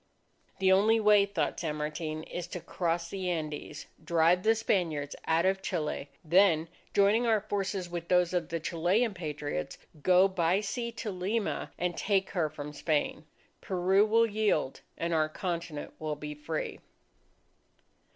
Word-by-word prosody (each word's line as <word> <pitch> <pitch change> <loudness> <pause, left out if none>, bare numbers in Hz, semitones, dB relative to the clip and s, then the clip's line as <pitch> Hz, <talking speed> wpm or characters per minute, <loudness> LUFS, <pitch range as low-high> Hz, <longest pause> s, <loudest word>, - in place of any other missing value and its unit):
The 190 0 +3
only 215 +4 +5
way, 210 -2 +5
thought 200 -5 -1
San 155 -3 -2
Martin, 155 +1 -4
is 175 +1 -6
to 180 - -6
cross 170 0 -2
the 190 -2 -3
Andes, 155 -4 -4 0.2
drive 170 +2 +3
the 225 +3 +4
Spaniards 165 -10 -1
out 165 +2 +3
of 190 0 +2
Chile, 155 -6 -3 0.2
then 165 -1 +4 0.2
joining 210 +4 +3
our 220 -2 +3
forces 195 -3 -2
with 170 -1 -5
those 180 0 +3
of 175 -3 -1
the 165 - -2
Chilean 185 +8 +1
Patriots, 150 - -4 0.2
go 185 +3 +5
by 180 -1 +1
sea 235 +3 -3
to 225 -2 -4
Lima, 195 +4 -2
and 175 -1 -1
take 195 -2 0
her 165 -4 0
from 150 -1 -7
Spain. 150 0 -1 0.4
Peru 190 +2 +3
will 225 +2 +4
yield, 210 -10 0 0.2
and 170 0 -1
our 155 -1 +2
continent 170 -3 -4
will 155 -1 -2
be 150 0 -6
free! 150 +2 -4
175 Hz, 150 wpm, -30 LUFS, 160-200 Hz, 0.4 s, only